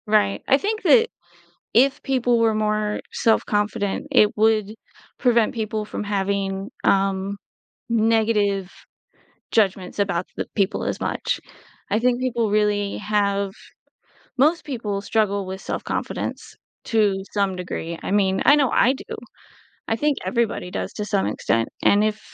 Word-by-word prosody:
Right, 210 -2 +2
I 270 - +5
think 430 +7 -2
that 460 -1 +5 0.7
if 270 +4 +4
people 245 -3 +1
were 225 -1 +3
more 215 0 0
self-confident, 210 -2 0
it 210 - +4
would 215 -1 +2 0.4
prevent 235 -4 +3
people 215 -1 -2
from 210 - -5
having, 195 0 -2
um, 195 0 +1 0.5
negative 215 -4 +2 0.8
judgments 195 -4 +1
about 185 -3 0
the - - -3
people 200 -1 0
as - - -3
much. - - -2 0.5
I 205 - +2
think 245 +1 +1
people 240 -4 0
really 205 -1 +1
have 200 -1 0 0.9
Most 310 +6 +3
people 225 -8 -3
struggle 200 -2 0
with 190 +1 -6
self-confidence - - -4 0.3
to 205 -4 +2
some 200 -2 0
degree, 170 -2 -5
I - - -4
mean, 190 -1 +2
I 290 - +7
know 280 -3 +3
I 255 - +4
do, - - -8 0.7
I - - +1
think 295 +3 +1
everybody 230 -7 -1
does - - -4
to 210 - -3
some 200 -2 0
extent, 115 0 0 0.2
and 205 +1 +5
if 215 0 -1
210 Hz, 135 wpm, -23 LUFS, 200-230 Hz, 0.9 s, I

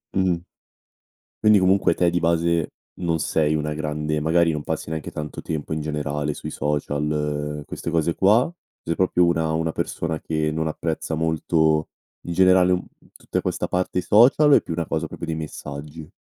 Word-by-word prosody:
Mh-mh, 95 -2 +2 1.0
quindi 105 -2 +5
comunque 95 +1 +3
te 90 -1 +2
di 85 - +1
base 85 -1 +1 0.2
non 85 -3 -1
sei 75 +1 +1
una 75 0 -1
grande 75 0 -2
magari 85 +2 +3
non 75 -2 -3
passi - - -3
neanche 80 -1 -4
tanto 75 0 -6
tempo 80 -1 -4
in 80 - -1
generale 75 -1 -2
sui - - -7
social 75 0 -2
queste 85 - -5
cose 80 0 +1
qua, 110 - +4 0.3
sei 85 0 -2
proprio 90 -1 +3
una 80 -2 +1
una 80 +1 0
persona 80 0 -3
che 80 -1 -1
non 80 +1 -2
apprezza 80 0 -3
molto 80 -1 +1 0.4
in 85 - -3
generale, 95 0 +5
mhmm, 90 - -1 0.3
tutta - - -3
questa - - -2
parte, 90 0 -1
i - - 0
social 125 +10 +5
o - - +8
è - - +2
più - - -6
una 85 0 -2
cosa - - -2
proprio - - -7
dei 80 -1 -2
messaggi? 75 0 -7
80 Hz, 175 wpm, -23 LUFS, 75-85 Hz, 1.0 s, o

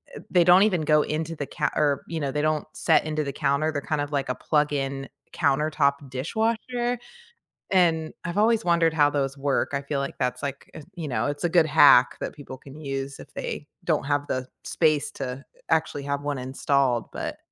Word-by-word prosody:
eh, - - -7
they 175 -2 +4
don't 180 +2 +7
even 185 -6 +2
go 150 0 +4
into 160 +2 -3
the 145 -2 -5
ca - - -1
or, 145 -2 +1
you 165 -1 -4
know, 140 -3 -2
they 150 - -1
don't 155 -1 0
set - - +2
into 155 -1 -1
the 140 - -4
counter. 155 +4 +1
They're 145 - -3
kind 150 0 -2
of 145 0 -4
like 140 -2 -1
a 125 - 0
plug 150 -1 +1
in 135 -1 -3 0.2
countertop 140 -1 +1
dishwasher. 230 - -1 0.7
And 165 -4 +2
I've 175 +3 -3
always 220 0 +3
wondered 170 -2 +3
how 145 -2 +4
those 140 -1 -2
work. 140 0 0
I 140 - 0
feel 140 0 -3
like 140 - -4
that's 125 0 -1
like 140 -1 -5
eh - - -9
you 165 -3 -5
know, 115 -2 -1
it's 145 0 -4
a - - +2
good 170 -1 +4
hack 145 -5 +6
that - - -4
people 135 -3 -9
can 135 +3 -13
use 135 -2 -5
if - - -13
they - - -5 0.2
don't - - +1
have 145 0 0
the 130 0 -2 0.2
space 155 -3 +1
to 135 - -4
uh 125 +2 -6 0.3
actually 160 -3 0
have 140 0 -2
one 145 -1 -2
installed 130 -1 0
but - - -4
145 Hz, 210 wpm, -25 LUFS, 140-160 Hz, 0.7 s, don't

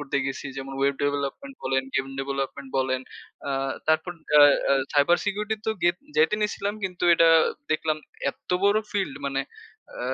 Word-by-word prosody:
করতে 140 -1 -2
গেছি। 135 +1 -4
যেমন 135 0 -6
ওয়েব 140 0 +2
ডেভেলপমেন্ট 145 - -2
বলেন, 135 0 +1
গেম 135 - +1
ডেভেলপমেন্ট 135 0 -4
বলেন। 130 -1 0 0.5
আ - - -1 0.4
তারপর 160 +3 +2 0.3
আ - - +9 0.3
আ - - +6 0.2
সাইবার 145 +4 +4
সিকিউরিটি 210 +2 -1
তো - - +3
গেত 175 +1 +3 0.2
যেতে 160 +7 +4
নিয়েছিলাম 205 -1 -1
কিন্তু 180 -1 -3
এটা 165 0 +5 0.4
দেখলাম 155 0 +1 0.3
এত্ত - - -14
বড় 205 +2 +5
ফিল্ড 195 -9 -1
মানে 135 -1 -1 0.5
আ - - -8
150 Hz, 160 wpm, -25 LUFS, 135-195 Hz, 0.5 s, আ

